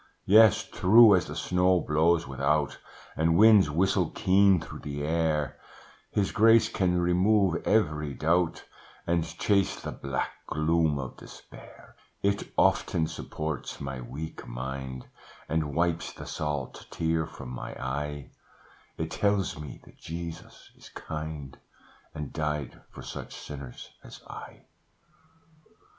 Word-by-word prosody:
"Yes, 110 +1 +6
true 105 +2 +7
as 90 - 0
the - - -7
snow 90 0 +2
blows 80 +2 +2
without, 70 +2 0 0.4
And 80 +1 +2
winds 105 -5 +7
whistle 90 +2 +1
keen 95 0 +4
through 85 - -9
the 75 0 -5
air, 80 -3 0 0.5
His 100 -1 0
grace 115 +1 +5
can 90 -2 +1
remove 90 +1 +2
every 75 -9 +1
doubt, 85 +4 +1 0.4
And 85 -1 +1
chase 95 +4 0
the - - -6
black 70 -1 -3 0.2
gloom 80 -1 +1
of 65 -2 -6
despair: - - -14 0.3
It 100 0 0
often 80 - +2
supports 75 -2 -5
my 70 -2 -5
weak 70 +7 -7
mind, 65 +1 -6 0.4
And 75 -3 -1
wipes 85 0 0
the - - -10
salt 75 -4 -4
tear 80 -1 -1
from - - -10
my 60 - -7
eye, 70 +2 -4 0.7
It - - -4
tells 100 -6 0
me 75 -3 -9
that - - -19
Jesus 85 0 -8
is - - -15
kind, 75 -3 -7 0.6
And 75 -2 -6
died 75 -3 -3
for - - -11
such - - -8
sinners 70 -4 -9
as - - -12
I. - - -11
80 Hz, 125 wpm, -28 LUFS, 75-90 Hz, 0.7 s, true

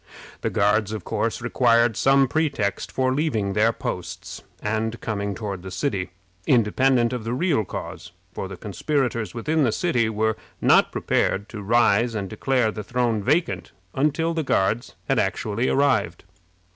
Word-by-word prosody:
The - - 0
Guards, 105 +1 +1
of 105 -4 -5
course, - - -2
required 115 -2 +3
some 135 +3 +4
pretext 140 -9 -1
for 130 -1 +1
leaving 115 -10 0
their 110 +3 +3
posts - - -6 0.2
and 110 +2 -2
coming 100 -3 -3
toward 100 -4 -5
the 95 - -8
city, 95 -1 -2 0.4
independent 125 0 +3
of 125 -3 -3
the 115 +2 -2
real 155 -6 +1
cause, - - -7 0.2
for 95 - -4
the 95 -1 -8
conspirators 115 - -2
within 155 +6 +1
the 120 - +2
city 125 - +1
were 110 0 0 0.2
not - - +4
prepared 100 +2 0
to 110 -3 -7
rise 115 +1 +3
and 100 -2 -2
declare 125 -5 +1
the 105 0 -6
throne 120 -1 0
vacant 150 - 0 0.2
until 155 +4 +1
the 165 - -1
Guards 115 -4 0
had - - +2
actually 110 +4 -1
arrived. 130 -11 +1
115 Hz, 155 wpm, -24 LUFS, 105-135 Hz, 0.4 s, some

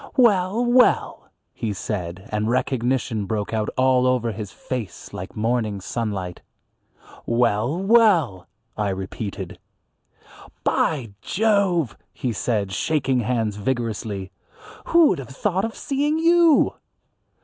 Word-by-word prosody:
"Well! 215 -1 +3
well!" 245 +1 +3 0.2
he 110 -3 -3
said, 95 -1 -5
and 105 +1 0
recognition 125 -4 0
broke 105 +1 -2
out 110 -1 0
all 130 -1 +4
over 125 -2 +1
his 105 -1 -6
face 125 -6 -6
like 95 - -7
morning 110 -2 0
sunlight. 95 -4 -4 0.9
"Well! 120 +4 +1
well!" 190 - +3 0.3
I 105 -1 -1
repeated. 95 +2 -5 1.0
"By 130 -9 0
Jove!" 195 - +1 0.2
he 125 -3 -3
said, 105 -3 -1
shaking 135 +3 0
hands 110 -3 -1
vigorously, 105 -4 -3 0.5
"who 335 -2 +5
would 175 - 0
have 130 - -8
thought 190 +8 -1
of 225 - -5
seeing 290 +2 0
you?" 335 -1 +5
120 Hz, 115 wpm, -23 LUFS, -, 1.0 s, who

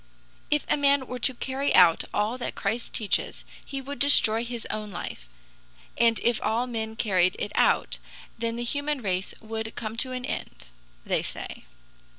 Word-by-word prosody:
"If 300 -1 +1
a - - +2
man 280 -1 +3
were 250 0 -6
to 260 +2 +1
carry 270 +3 -1
out 175 -3 +6
all 220 +5 0
that - - -4
Christ 225 +4 -2
teaches, 215 -3 -1 0.2
he 275 -1 -4
would 280 +2 -7
destroy 230 -5 +6
his 240 -2 -5
own 215 -1 -4
life; 170 - -7 0.7
and 230 -1 +3
if 235 -1 +2
all 235 +3 +1
men 220 -2 -4
carried 185 -5 +2
it 205 - -3
out, - - +2 0.4
then 230 0 -2
the 240 - -3
human 285 +1 -1
race 185 -1 -1
would 220 0 -5
come 220 -1 -4
to 255 +2 +1
an 255 -1 -4
end," - - -6 0.4
they - - +1
say. - - -7
230 Hz, 170 wpm, -27 LUFS, 215-260 Hz, 0.7 s, out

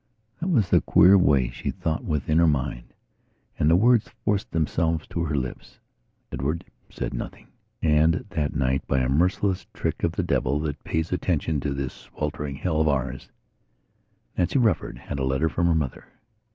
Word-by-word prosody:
That 175 - -3
was 125 - +3
the - - +5
queer 90 +4 +6
way 70 -10 +3
she - - -5
thought 80 0 -2
within 75 0 0
her 85 - +5
mind, 65 -5 -1 0.7
and 75 - +3
the 85 - +6
words 115 +3 +4 0.2
forced 100 -1 0
themselves 80 0 0
to 85 - -2
her 75 -2 -1
lips. 65 -3 -5 0.5
Edward 75 +6 -2 0.2
said - - -4
nothing. - - -7 0.3
And 80 +2 +3
that 75 -6 -1
night, 65 -2 +1
by 65 -1 +1
a 65 - 0
merciless 90 +6 +1
trick - - -2
of - - +1
the - - -1
devil 70 +3 0
that 75 -2 -4
pays 80 +1 -2
attention 80 -4 0
to 70 +1 -2
this 70 -2 -3
sweltering 70 -1 -5
hell 80 +2 0
of 80 - +2
ours, 65 -3 -1 1.1
Nancy 90 +9 +1
Rufford 115 -4 +1
had 70 - -6
a - - -1
letter 65 +5 +1
from 85 +5 0
her 85 - +3
mother. 75 -6 -3
80 Hz, 175 wpm, -25 LUFS, 70-85 Hz, 1.1 s, queer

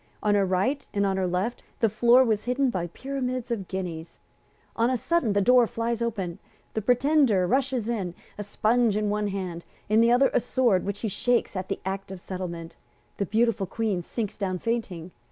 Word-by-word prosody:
On 210 -1 +3
her 200 -2 +3
right 200 +10 0
and 200 0 +2
on 195 -1 0
her 190 -1 0
left 185 +7 -2 0.2
the 230 - +4
floor 240 +4 +5
was 220 -3 0
hidden 250 +1 +1
by 175 -4 -2
pyramids 255 +4 -4
of 200 -6 -2
guineas. 175 -4 -5 0.6
On 230 +1 +2
a 255 - +1
sudden 275 -5 +1
the 200 - +2
door 245 +2 +5
flies 230 +1 -2
open. 200 -7 -3 0.3
The 220 - -1
Pretender 245 -4 +3
rushes 260 +1 0
in, 195 -7 -2 0.2
a - - -6
sponge 215 +2 +1
in 210 -1 0
one 210 0 0
hand, 185 -4 -4 0.3
in 215 +1 +5
the 230 +1 +4
other 255 +3 +4
a - - +4
sword 235 -6 +1
which 200 0 -3
he 225 - -1
shakes 240 +2 0
at 185 0 -4
the - - -2
Act 195 0 -4
of 190 - -7
Settlement. 170 -3 -6 0.4
The 200 - -1
beautiful 220 -2 +1
Queen 210 -2 -1
sinks 210 +3 -4
down 190 -3 -2
fainting. 185 -6 -3
215 Hz, 195 wpm, -26 LUFS, 190-240 Hz, 0.6 s, floor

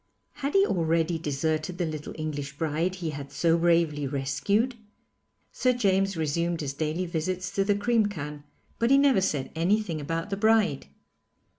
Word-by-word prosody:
Had 280 +4 -4
he 395 0 +6
already 165 - +1
deserted 155 +3 -2
the 175 - 0
little 155 -2 -6
English 145 -2 -4
bride 165 +4 -1
he 170 -4 -4
had 140 -1 -7
so 165 +4 +2
bravely 165 -4 +2
rescued? 145 - 0 0.8
Sir 255 -1 +2
James 195 -5 +1
resumed 170 +2 -1
his 140 -2 -3
daily 155 +5 -2
visits 180 +2 -3
to 195 0 +1
the 205 +1 +2
cream 225 +1 +2
can, 150 -6 -6 0.4
but 235 - +2
he 275 - +6
never 275 -7 +4
said 145 -8 -1
anything 175 -1 0
about 165 +6 -3
the 195 - -1
bride. 215 - +2
170 Hz, 160 wpm, -27 LUFS, 150-195 Hz, 0.8 s, he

